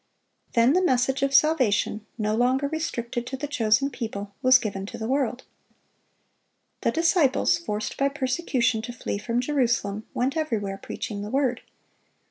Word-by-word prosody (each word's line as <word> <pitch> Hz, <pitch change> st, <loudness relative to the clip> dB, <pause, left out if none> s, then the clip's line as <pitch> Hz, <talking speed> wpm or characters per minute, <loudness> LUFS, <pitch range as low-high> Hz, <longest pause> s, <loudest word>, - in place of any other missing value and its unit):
Then 235 Hz, +3 st, +4 dB
the 365 Hz, -, +3 dB
message 260 Hz, -5 st, +1 dB
of 275 Hz, 0 st, +1 dB
salvation, 255 Hz, -7 st, +2 dB
no 215 Hz, -1 st, 0 dB
longer 255 Hz, +4 st, +2 dB
restricted 240 Hz, -6 st, -3 dB
to 265 Hz, -, -4 dB
the 290 Hz, -, -4 dB
chosen 275 Hz, 0 st, +1 dB
people, 205 Hz, -5 st, -5 dB
was 255 Hz, 0 st, +7 dB
given 200 Hz, -5 st, -4 dB
to 235 Hz, -, -7 dB
the 220 Hz, -1 st, -4 dB
world. 260 Hz, -1 st, 0 dB, 1.4 s
The -, -, +2 dB
disciples, 330 Hz, -3 st, +2 dB
forced 210 Hz, -10 st, -4 dB
by 275 Hz, 0 st, +3 dB
persecution 255 Hz, -4 st, 0 dB
to 240 Hz, +2 st, -6 dB
flee 215 Hz, -4 st, -4 dB
from 230 Hz, +3 st, -1 dB
Jerusalem, 240 Hz, -6 st, 0 dB
"went 260 Hz, +4 st, 0 dB
everywhere 215 Hz, -11 st, -2 dB
preaching 205 Hz, -2 st, -5 dB
the 205 Hz, -, -5 dB
Word." 260 Hz, -1 st, 0 dB
250 Hz, 150 wpm, -25 LUFS, 220-275 Hz, 1.4 s, was